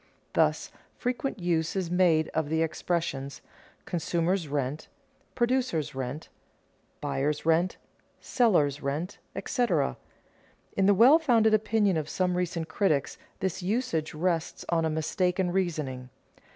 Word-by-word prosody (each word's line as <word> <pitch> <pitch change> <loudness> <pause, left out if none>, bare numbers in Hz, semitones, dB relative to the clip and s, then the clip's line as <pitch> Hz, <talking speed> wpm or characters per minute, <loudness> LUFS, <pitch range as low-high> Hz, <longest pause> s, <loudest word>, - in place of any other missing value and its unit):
Thus, - - +1 0.3
frequent 250 +1 -2
use 170 -3 0
is 185 -3 -2
made 175 -4 +3
of 155 -2 -2
the 160 +1 +2
expressions: 155 -4 -2 0.5
consumer's 170 +1 -1
rent, 145 +1 -3 0.5
producer's 240 - 0
rent, 130 +3 -5 0.7
buyer's 145 +3 -1
rent, 165 +3 +2 0.4
seller's 165 - +2
rent, 150 +7 -3 0.2
etc. 245 -2 0 0.8
In 195 -1 +3
the 200 - +5
well 260 - +7
founded 230 -8 +3
opinion 215 -3 +2
of 155 -1 -3
some 180 -1 0
recent 175 -2 -2
critics 160 -4 0 0.2
this 190 0 -2
usage 180 -6 -1
rests 165 0 -1
on 165 -1 +2
a - - +1
mistaken 180 +3 0
reasoning. 155 -9 -2
170 Hz, 120 wpm, -28 LUFS, 155-195 Hz, 0.8 s, well